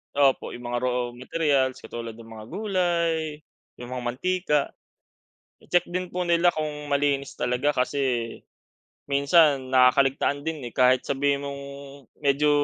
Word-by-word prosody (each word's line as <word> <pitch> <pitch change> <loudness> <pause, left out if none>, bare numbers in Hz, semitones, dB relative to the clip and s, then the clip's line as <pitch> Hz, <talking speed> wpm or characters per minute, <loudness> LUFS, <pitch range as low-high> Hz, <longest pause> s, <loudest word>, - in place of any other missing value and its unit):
opo 140 -2 +2
yung 120 - -10
mga 120 - 0
raw 125 -1 -1
materials 130 +1 0
katulad 115 -1 -7
ng 115 0 -13
mga 110 -1 -9
gulay, 170 - -1 0.3
yung 120 0 -9
mga 125 -1 -4
mantika. 150 +5 0 1.0
I-check 175 0 +1
din 180 0 -4
po 180 0 -2
nila 170 +1 +4
kung 150 -2 -4
malinis 140 -1 +1
talaga 125 +4 +1
kasi 125 -3 -1 0.7
minsan 140 -1 +4
nakakaligtaan 135 +2 +3
din 160 -2 -3
eh - - -21
kahit 130 +1 +4
sabihin 140 0 0
mong 140 0 -6 0.6
medyo, 145 +1 +3
140 Hz, 135 wpm, -25 LUFS, 125-160 Hz, 1.0 s, nila